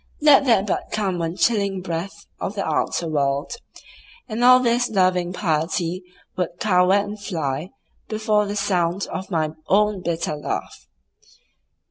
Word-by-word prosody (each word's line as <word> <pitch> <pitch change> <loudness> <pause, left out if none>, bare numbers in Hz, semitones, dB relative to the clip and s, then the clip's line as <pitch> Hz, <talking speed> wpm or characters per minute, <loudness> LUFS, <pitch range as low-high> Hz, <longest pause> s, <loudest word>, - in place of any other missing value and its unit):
Let 290 -2 +6
there 230 -7 +4
but 200 - -2
come 195 -4 -1
one 165 0 -2
chilling 200 -3 +1
breath 180 +3 -5
of 200 - -4
the 195 - -2
outer 160 +2 -1
world, 140 0 -1 0.8
and 230 0 -2
all 255 +1 +8
this 245 0 +1
loving 185 -3 +1
piety 170 0 -1 0.3
would 175 -1 -3
cower 180 -2 +3
and 205 +1 -1
fly 155 -3 -3 0.4
before 215 -1 +1
the 205 - -4
sound 180 -1 0
of 190 - -5
my 160 -4 0 0.2
own 210 0 +2
bitter 170 -3 -2
laugh. 150 - -5
190 Hz, 140 wpm, -22 LUFS, 170-210 Hz, 0.8 s, all